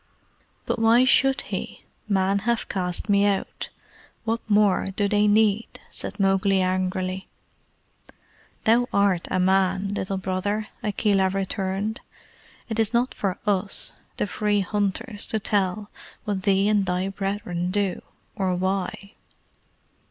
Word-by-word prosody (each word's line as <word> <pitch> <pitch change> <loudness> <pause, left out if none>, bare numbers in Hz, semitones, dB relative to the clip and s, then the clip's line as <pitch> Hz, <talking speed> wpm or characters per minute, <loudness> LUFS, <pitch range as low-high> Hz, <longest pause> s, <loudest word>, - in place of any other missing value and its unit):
"But - - -1
why 230 +3 +5
should 270 +1 +4
he? - - -6 0.3
Men 195 0 +2
have 235 +3 -1
cast 180 0 -2
me 200 -1 +4
out. 200 -1 -2 0.5
What 225 0 0
more 205 -2 +3
do 205 0 +1
they 210 +1 +3
need?" 215 +1 +2
said 200 - -5
Mowgli 195 0 +3
angrily. 185 0 -1 1.4
"Thou 235 +2 +4
art 200 -4 +2
a 185 - 0
man, 190 +1 +2
Little 195 -1 -2
Brother," 190 +3 -2
Akela 200 -2 +2
returned. 195 +2 -2 0.7
"It 225 -2 -3
is 225 +1 +2
not 245 +2 +2
for 195 -3 -2
US, 195 -1 +1 0.2
the - - 0
Free 205 0 0
Hunters, 205 +2 -2
to 220 - 0
tell 205 0 -1 0.4
thee 195 0 +2
what 195 - 0
thy 180 +1 0
brethren 195 -3 -3
do, 200 -1 0 0.3
or 190 -3 0
why." 190 +2 -2
200 Hz, 125 wpm, -24 LUFS, 190-210 Hz, 1.4 s, why